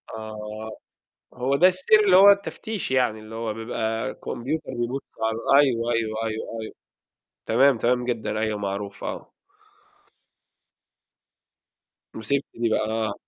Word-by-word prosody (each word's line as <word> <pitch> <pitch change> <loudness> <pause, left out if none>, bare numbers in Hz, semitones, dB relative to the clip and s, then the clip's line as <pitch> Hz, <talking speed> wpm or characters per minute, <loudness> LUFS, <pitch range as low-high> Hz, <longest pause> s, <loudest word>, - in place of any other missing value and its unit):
آه. 110 0 -7 0.6
هو 130 +3 0
ده 175 - +6
السير 185 +4 +4
اللي 185 -2 +6
هو 200 +2 +9
التفتيش 200 -2 -1
يعني؟ 125 -4 +1
اللي 110 +1 -11
هو 115 -1 -3
بيبقى 110 -1 -3
كمبيوتر 140 +5 -4
بيبص 120 +3 -2 0.2
على 115 +5 +3
أيوه، 120 -3 0
أيوه، 110 -1 -1
أيوه، 110 +1 -4
أيوه. 110 - -7 0.7
تمام، 130 +2 +4
تمام 125 +1 +1
جدًا، 115 -3 -2
أيوه 110 -1 -1
معروف، 100 0 -5
آه. - - -6 2.8
مسكتِ 135 +6 -1
دي 115 0 -1
بقى، - - +2
آه. 110 -2 -1
115 Hz, 125 wpm, -24 LUFS, 110-135 Hz, 2.8 s, هو